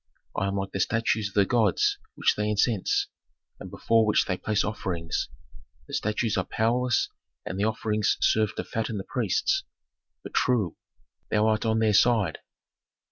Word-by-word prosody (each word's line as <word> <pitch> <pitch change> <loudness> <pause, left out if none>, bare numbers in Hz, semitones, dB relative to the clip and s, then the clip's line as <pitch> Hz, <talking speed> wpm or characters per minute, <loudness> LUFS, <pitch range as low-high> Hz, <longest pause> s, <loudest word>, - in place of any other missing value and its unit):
I 95 - 0
am 100 - -2
like 95 0 -3
the 95 - -4
statues 110 +1 +1
of 100 - -14
the 100 -1 +5
gods 110 -4 +2 0.2
which - - +2
they 105 0 -1
incense, 105 -1 +1 0.5
and - - -8
before 115 -1 +2
which 105 -1 +3
they 90 - -1
place 105 +3 0
offerings. 90 -6 -3 0.6
The - - -11
statues 105 +1 0
are 95 - +1
powerless 120 +5 +1 0.4
and 95 - -4
the 100 - +2
offerings 110 -1 0
serve 110 -1 +2
to - - -3
fatten 110 -1 -3
the 95 - -4
priests. 115 -4 0 0.6
But, - - -9
true, 110 -9 +1 0.5
thou 105 0 +2
art 110 0 +1
on 110 0 +2
their 110 -1 +2
side." 105 -6 +3
105 Hz, 165 wpm, -26 LUFS, 100-110 Hz, 0.6 s, the